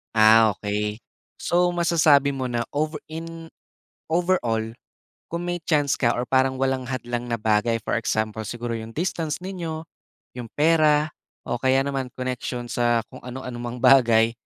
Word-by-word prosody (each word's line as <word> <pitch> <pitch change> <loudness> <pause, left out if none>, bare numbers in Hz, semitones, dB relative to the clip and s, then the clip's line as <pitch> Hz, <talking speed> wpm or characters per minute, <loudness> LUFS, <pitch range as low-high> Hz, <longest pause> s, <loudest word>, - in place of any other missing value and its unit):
Ah, 110 0 +7
okey. 105 +1 -2 0.4
So 175 +1 +2
masasabi 155 -5 +3
mo 130 - -3
na 120 0 -2
over 155 +1 -1
in 165 +1 -8 0.6
overall, 170 -10 +1 0.7
kung 170 +1 -4
may 175 0 -2
chance 145 -4 +1
ka 120 -2 +2
or 120 - -1
parang 130 0 +2
walang 130 -1 0
hadlang 120 -1 -4
na 120 - 0
bagay, 110 +2 +2
for - - 0
example 110 +1 -1
siguro 120 0 -4
yung 115 0 -8
distance 165 -1 -2
ninyo, 170 -4 -5 0.5
yung 120 -2 -6
pera, 155 -1 +3 0.3
o 120 - -3
kaya 130 +1 +3
naman 135 -2 -2
connection 125 -1 -4
sa 120 -1 +1
kung - - -10
ano-anumang 125 -1 -6
bagay, 120 -3 +6
130 Hz, 145 wpm, -24 LUFS, 120-155 Hz, 0.7 s, Ah